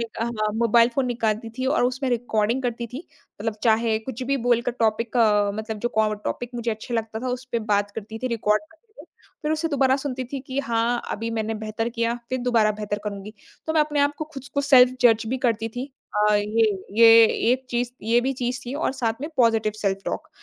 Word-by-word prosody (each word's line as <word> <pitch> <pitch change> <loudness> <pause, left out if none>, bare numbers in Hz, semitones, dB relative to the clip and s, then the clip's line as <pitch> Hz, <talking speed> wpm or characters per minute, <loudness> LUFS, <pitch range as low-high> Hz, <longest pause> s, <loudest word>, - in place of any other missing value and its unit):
नि - - 0 0.2
अ, 230 - +1 0.3
mobile 230 +1 +4
phone 265 -1 +1
निकालती 225 -2 -1
थी 260 - -1
और 270 -2 +2
उसमें 255 +2 -1
रिकॉर्डिंग 235 +1 0
करती 240 -1 -2
थी। 275 +7 -7 0.3
मतलब 225 -2 -2
चाहे 225 -1 +2
कुछ 245 +2 -7
भी 275 +2 0
बोलकर 240 +1 +2
टॉपिक 225 +2 0
अ, 210 -3 +4
मतलब 220 0 -5
जो 240 - -1
को 215 -1 +3
टॉपिक 230 +3 -5
मुझे 235 -1 -2
अच्छा 220 +2 -5
लगता 220 -1 -3
था, 255 - -3
उस 250 +1 -3
पे 235 - +2 0.2
बात 205 0 0
करती 220 +1 -7
थी - - 0
रिकॉर्ड 210 +1 +1
करके। 320 +4 -25 0.6
फिर 305 +1 0
उसे 320 +1 -1
दोबारा 270 -3 +2
सुनती 265 -2 -4
थी 275 - -3
कि 265 +1 -4
हाँ, 235 -2 0
अभी 230 +2 -3
मैंने 220 0 -2
बेहतर 215 +1 -3
किया, 230 0 -1
फिर 255 - -1
दोबारा 230 -4 +3
बेहतर 205 0 -4
करूँगी। 200 0 -6 0.3
तो 315 - 0
मैं 315 - +3
अपने 295 -1 +1
आप 285 +1 +2
को 310 - -2
खुद 270 -1 -8
को 280 - +2
सेल्फ़ 255 -3 +6
जज 225 -2 +4
भी 260 - -1
करती 225 -1 0
थी। 250 +2 -3 0.4
अ, 210 - +4
ये 215 +2 +2 0.3
ये, 230 0 +9 0.3
एक 260 0 -2
चीज़ 245 0 -1
ये 230 +2 +3
भी 265 +2 -1
चीज़ 250 +1 -1
थी 255 - -4
और 290 -2 -1
साथ 225 0 0
में 295 - -4
पॉज़िटिव 225 -3 +3
सेल्फ़ 195 -1 +1
टॉक - - -4
235 Hz, 220 wpm, -24 LUFS, 220-255 Hz, 0.6 s, ये